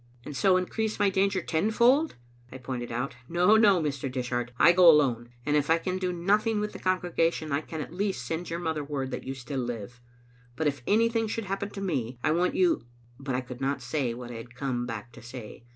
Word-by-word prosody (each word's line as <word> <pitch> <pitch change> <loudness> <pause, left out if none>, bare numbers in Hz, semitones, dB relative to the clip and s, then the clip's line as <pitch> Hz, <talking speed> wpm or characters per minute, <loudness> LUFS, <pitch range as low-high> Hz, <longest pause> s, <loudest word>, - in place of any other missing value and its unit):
"And 150 - -7
so 185 +8 +4
increase 215 +4 -2
my 205 -1 +3
danger 190 -1 +1
tenfold?" 235 - +3 0.4
I 130 - -7
pointed 125 -2 -5
out. 125 +2 -3
" - - -26
No, 180 +5 +4
no, 205 -4 +6
Mr. 140 -4 -2
Dishart, 120 -1 -2
I 170 - +7
go 175 0 +7
alone; 125 -7 +4 0.2
and 145 0 +1
if 145 0 +1
I 165 - +5
can 185 +2 -3
do 185 -1 -1
noth 195 +6 +1
ing 220 -2 +1
with 210 0 -3
the - - -8
congregation, 170 -4 0
I 140 +2 +1
can 155 0 -6
at 155 - -7
least 190 -8 -2
send 165 +6 -3
your 165 - -2
mother 160 -3 -2
word 140 -2 -3
that - - -5
you 135 +1 -4
still 130 +1 -5
live. 120 -1 -5 0.5
But 160 - -2
if 140 -3 0
anything 230 +1 +2
should 225 0 -3
happen 195 +1 -3
to 200 - -7
me, 130 -10 -2
I 155 - +3
want 175 +3 +1
you 345 - +2 0.2
" - - -29
But 135 -2 -3
I 130 - 0
could 125 0 -9
not 135 +1 0
say 125 -2 -1
what 120 0 -8
I 120 - -6
had 120 +1 -10
come 125 -2 -2
back 115 0 -6
to - - -12
say. 115 -1 -10
155 Hz, 235 wpm, -28 LUFS, 125-190 Hz, 0.5 s, I